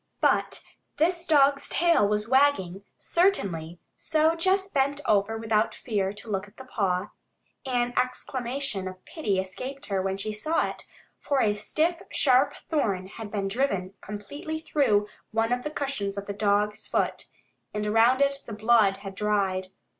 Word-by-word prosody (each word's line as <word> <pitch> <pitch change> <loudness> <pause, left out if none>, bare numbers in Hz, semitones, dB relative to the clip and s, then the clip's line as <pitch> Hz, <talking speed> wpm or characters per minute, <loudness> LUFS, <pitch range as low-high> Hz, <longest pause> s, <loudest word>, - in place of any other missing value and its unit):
But - - +1 0.3
this 340 +3 +1
dog's 280 -2 +4
tail 335 -11 +3
was 210 +1 -1
wagging, 245 -9 +2
certainly, 185 - +1 0.2
so 315 0 +2
Jess 380 +3 +1
bent 280 -4 0
over 210 +1 +2
without 220 -1 +1
fear 200 -5 -1
to 210 +3 -12
look 200 -1 -2
at 205 - -21
the 265 - -10
paw. 195 -5 -1 0.6
An 245 -1 0
exclamation 250 -4 -2
of 185 0 -9
pity 205 - -1
escaped 255 +10 -5
her 195 -2 -1
when 190 0 -2
she 215 +2 -3
saw 310 +10 +1
it, - - -8 0.3
for 280 -2 0
a 210 -4 +3
stiff, 315 - -1
sharp 270 +1 +4
thorn 200 - 0
had 210 +2 -8
been 200 -2 -2
driven 195 -4 -1
completely 285 +10 -6
through 270 -10 +2 0.2
one 225 +1 0
of 245 0 +1
the 300 - -4
cushions 270 -10 -3
of 200 - -4
the 200 - -4
dog's 210 +1 +1
foot, - - -1 0.5
and 210 0 -3
around 230 +5 +4
it 275 0 0
the 225 - -6
blood 215 -2 +4
had 195 - -5
dried. 195 -2 0
225 Hz, 160 wpm, -27 LUFS, 200-280 Hz, 0.6 s, dog's